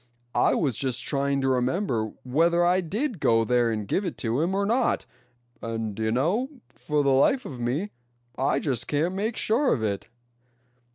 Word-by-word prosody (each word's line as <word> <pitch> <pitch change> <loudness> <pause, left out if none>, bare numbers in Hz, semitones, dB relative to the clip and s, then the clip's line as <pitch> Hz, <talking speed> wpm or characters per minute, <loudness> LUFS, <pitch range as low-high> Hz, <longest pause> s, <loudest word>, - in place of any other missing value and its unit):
I - - +3
was 135 -9 0
just 130 -2 -2
trying 140 -1 0
to 135 - 0
remember 125 - 0
whether 170 +7 +2
I 180 +2 +3
did 215 - -3
go 115 -4 +3
there 120 0 +2
and 105 -2 -3
give 190 - 0
it 180 - -4
to 115 +5 +1
him 180 +4 0
or 200 0 +1
not; 235 +5 +1 0.6
and 115 -2 -3
d'ye 110 +2 -2
know, 175 - +1 0.2
for 150 -1 -1
the 140 - +3
life 140 - +3
of 130 - -7
me 135 +12 -2 0.4
I 130 - +1
just 130 -6 -1
can't 155 +5 0
make 215 +4 -2
sure 255 +5 +2
of 115 - 0
it." 100 -2 -2
140 Hz, 180 wpm, -26 LUFS, 120-185 Hz, 0.6 s, I